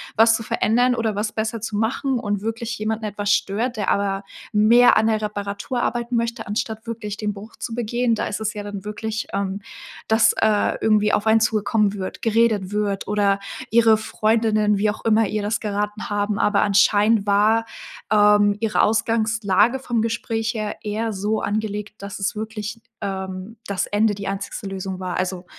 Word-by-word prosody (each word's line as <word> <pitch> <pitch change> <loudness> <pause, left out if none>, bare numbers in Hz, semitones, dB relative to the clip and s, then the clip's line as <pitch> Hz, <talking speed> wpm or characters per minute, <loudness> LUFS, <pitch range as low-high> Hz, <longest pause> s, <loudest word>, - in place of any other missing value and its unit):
was 225 0 +5
zu 225 - -4
verändern 245 +4 +2
oder 220 -3 -1
was 210 +1 -1
besser 220 +1 -2
zu 220 -1 -4
machen 250 +3 0
und 205 -4 -2
wirklich 225 +1 -4
jemanden 220 +1 -2
etwas 205 0 -2
stört, 225 +5 0
der 205 - -1
aber 200 -1 0 0.3
mehr 230 +4 +6
an 220 - +3
der 220 -1 +1
Reparatur 205 +4 -3
arbeiten 240 0 -1
möchte, 230 0 -1
anstatt 220 +2 -3
wirklich 215 -3 -5
den 210 -1 -2
Bruch 205 +3 -11
zu 230 - -6
begehen. 240 +1 0
Da 220 - -1
ist 205 - -3
es 220 0 -2
ja 210 - -5
dann 205 -1 -7
wirklich, 220 +1 -4
ähm, 195 0 -2 0.5
dass, 220 0 +4
äh, 215 -1 +2
irgendwie 210 -1 +3
auf 210 - +1
einen 220 0 +5
zugekommen 215 -1 +1
wird, 185 -2 -6
geredet 220 -4 +2
wird 205 -2 -1
oder 200 -1 +2 0.3
ihre 225 -1 +5
Freundinnen, 215 -1 +1
wie 210 +1 +2
auch - - -10
immer 220 -1 +3
ihr 210 +1 -2
das 210 +2 -1
geraten 210 0 -3
haben, 205 0 -1
aber 205 -1 +2
anscheinend 205 +1 +3
war, 215 +3 +3 0.5
ähm, 205 -1 +5
ihre 225 -1 +1
Ausgangslage 220 +1 +2
vom 240 -3 -1
Gespräch 225 0 -2
her 215 -2 -4
eher 220 +1 -2
so 210 +3 -1
angelegt, 210 0 -3
dass 200 +1 -6
es 195 +2 -1
wirklich, 215 0 -5 0.2
ähm 190 +2 -5
das 200 -2 -1
Ende 210 +1 +2
die 200 -1 -6
einzigste 195 0 -4
Lösung 190 -1 -5
war, 180 -1 -3
also, 185 -1 -3
215 Hz, 180 wpm, -22 LUFS, 205-225 Hz, 0.5 s, mehr